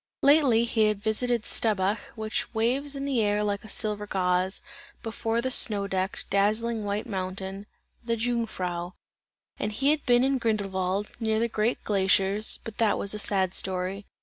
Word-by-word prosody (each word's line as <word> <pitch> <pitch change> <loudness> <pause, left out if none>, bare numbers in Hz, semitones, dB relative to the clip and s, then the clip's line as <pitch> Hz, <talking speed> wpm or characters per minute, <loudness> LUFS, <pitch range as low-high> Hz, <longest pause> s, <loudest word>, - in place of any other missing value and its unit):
Lately 275 -5 +5
he 225 -2 +2
had 215 -1 +1
visited 235 +1 +2
the - - -9
Staubbach, 205 -1 +1 0.2
which 220 -1 -3
waves 265 +6 +1
in 275 0 -4
the 265 -5 +1
air 210 0 +1
like 205 -1 -2
a 215 - -11
silver 210 0 -2
gauze, 185 -1 0 0.4
before 225 +1 -1
the 260 - -1
snow 205 -5 +3
decked, 190 0 -2
dazzling 215 +3 +1
white 205 +1 -2
mountain: 190 +1 -5 0.4
"the 230 -1 -1
Jungfrau." 185 -7 -2 0.7
And 210 - -2
he 270 +7 +2
had 305 -1 0
been 245 0 +5
in 270 0 +2
Grindelwald, 200 -3 -1
near 220 -2 0
the 230 +1 +1
great 220 +1 -1
glaciers; 195 +1 +2
but 225 - -9
that 220 -3 +3
was 200 - -1
a 210 - -4
sad 190 -3 +2
story. 190 +2 -2
210 Hz, 170 wpm, -27 LUFS, 195-230 Hz, 0.7 s, Lately